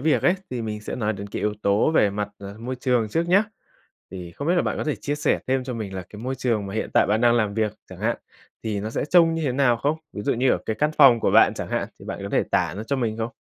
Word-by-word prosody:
việc 155 +2 +2
ấy, 180 - +4 0.2
thì 125 -2 -3
mình 105 -1 -4
sẽ - - -5
nói 110 -2 0
đến 100 0 -7
cái - - -5
yếu 105 0 0
tố 100 +9 +3
về 105 -10 +3
mặt, 105 0 -3
ờ, 100 +1 -9
môi 125 +3 -5
trường 125 -4 +1
trước 165 +8 -1
nhá. 200 +4 +5 0.7
Thì 90 -2 -8
không 145 +3 -4
biết 180 - +4
là 175 - +3
bạn - - -2
có - - -3
thể 150 - -1
chia 145 - -3
sẻ 150 - +1
thêm 130 0 0
cho 125 -2 -4
mình 105 -4 -5
là 95 - -4
cái 105 - -11
môi 130 +1 -2
trường 115 -6 -1
mà 100 - -6
hiện 110 - -2
tại - - +5
bạn 110 +2 +1
đang 120 -1 +4
làm 105 -3 +1
việc 110 -2 0 0.2
chẳng 90 - -10
hạn, 115 +2 0 0.5
thì 105 -3 -2
nó 110 +2 -4
sẽ - - -2
trông 165 0 +4
như 165 - -2
thế 130 - 0
nào 125 -3 +3
không? 145 +7 -1
Ví 105 - -6
dụ - - +1
như 125 +2 +2
ở - - +2
cái 110 - -2
căn 150 +1 +2
phòng 130 -6 +7
của - - +2
bạn - - +5
chẳng - - -5
hạn - - -2
thì - - -13
bạn - - -5
có - - -4
thể - - +2
tả 85 -2 +1
nó 105 - -4
cho 140 +3 -1
mình 115 -4 -1
không? 115 +1 -2
115 Hz, 310 wpm, -24 LUFS, 105-140 Hz, 0.7 s, phòng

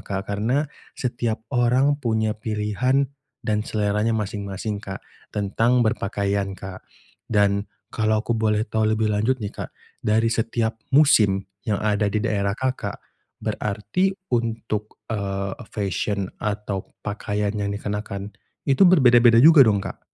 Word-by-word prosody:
Kak, 100 0 -4
karena 120 +9 0 0.3
setiap 120 -3 -2
orang 130 +4 +3
punya 110 -3 0
pilihan 110 +6 0 0.3
dan 105 0 -1
seleranya 105 +1 0
masing-masing 100 0 -3
Kak, 95 0 -6 0.3
tentang 115 +5 +2
berpakaian 100 -3 -1
Kak, 95 -1 -9 0.4
dan 100 -1 +2 0.3
kalau 110 -1 +1
aku 120 - -2
boleh 110 -1 +1
tahu 110 0 +1
lebih 110 0 +1
lanjut 110 +6 +1
nih 100 - -4
Kak, - - -10 0.3
dari 110 +2 +3
setiap 115 0 -1 0.2
musim 105 -10 +5 0.2
yang 105 - +2
ada 105 -1 +2
di 100 - -2
daerah 100 -2 0
Kakak, 130 -6 -2 0.4
berarti 105 - -1 0.2
untuk, 115 -2 -2 0.2
eee, 100 -1 -2
e - - -11
fesyen 100 -1 -2 0.2
atau 105 -2 -3
pakaian 105 0 -2
yang 100 -1 -2
dikenakan, 100 0 -4 0.3
itu 135 +5 +3
berbeda-beda 120 -8 +6
juga 160 -3 +8
dong, 105 -4 +3
Kak? - - -7
105 Hz, 130 wpm, -23 LUFS, 100-115 Hz, 0.4 s, juga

